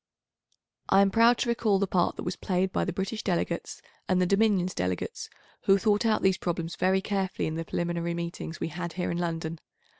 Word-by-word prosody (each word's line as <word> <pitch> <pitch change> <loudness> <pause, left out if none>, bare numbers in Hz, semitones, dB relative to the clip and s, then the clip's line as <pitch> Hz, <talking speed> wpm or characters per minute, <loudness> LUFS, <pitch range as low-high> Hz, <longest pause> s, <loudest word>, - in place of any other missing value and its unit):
I 195 - +6
am 195 0 +3
proud 230 +3 +5
to - - -1
recall 225 -4 +2
the 200 - +1
part 180 -2 +1
that - - -6
was 180 +1 -3
played 185 0 0
by - - +1
the 180 - -1
British 195 +4 -3
delegates 170 -2 -2 0.3
and 185 -1 +3
the 180 - +3
Dominions 200 -2 +2
delegates, 90 0 -3 0.4
who 195 - +6
thought 210 +3 +2
out 215 -1 +2
these 190 -1 +3
problems 170 -1 -3
very 190 +1 +2
carefully 195 -1 -1
in 155 - -3
the 165 +1 -3
preliminary 170 0 -2
meetings 170 -1 -5
we - - -2
had 175 +1 -5
here 180 0 -2
in 170 - -2
London. 165 -1 -3
185 Hz, 205 wpm, -28 LUFS, 170-195 Hz, 0.4 s, I